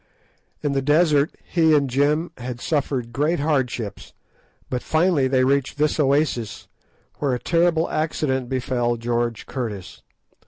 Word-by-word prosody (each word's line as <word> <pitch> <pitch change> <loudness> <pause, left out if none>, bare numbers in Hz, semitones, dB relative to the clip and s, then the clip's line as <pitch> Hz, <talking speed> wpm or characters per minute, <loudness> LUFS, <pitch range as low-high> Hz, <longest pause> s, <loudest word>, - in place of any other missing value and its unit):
In 145 - +1
the 135 -1 0
desert 150 0 +3
he 160 -3 +3
and 140 -2 +2
Jim 145 +6 +1
had 125 0 -5
suffered 130 -5 -2
great 150 +6 +1
hardships, 130 -8 -2 0.5
but 125 -1 -3
finally 160 -4 +2
they 130 -1 +2
reached 140 +1 +1
this 150 +1 +1
oasis, 140 -6 0 0.5
where 135 -4 +1
a - - -4
terrible 170 +1 +2
accident 135 -5 -1
befell 120 -2 -1
George 120 0 -2
Curtis. 110 -8 -6
140 Hz, 130 wpm, -22 LUFS, 125-155 Hz, 0.5 s, desert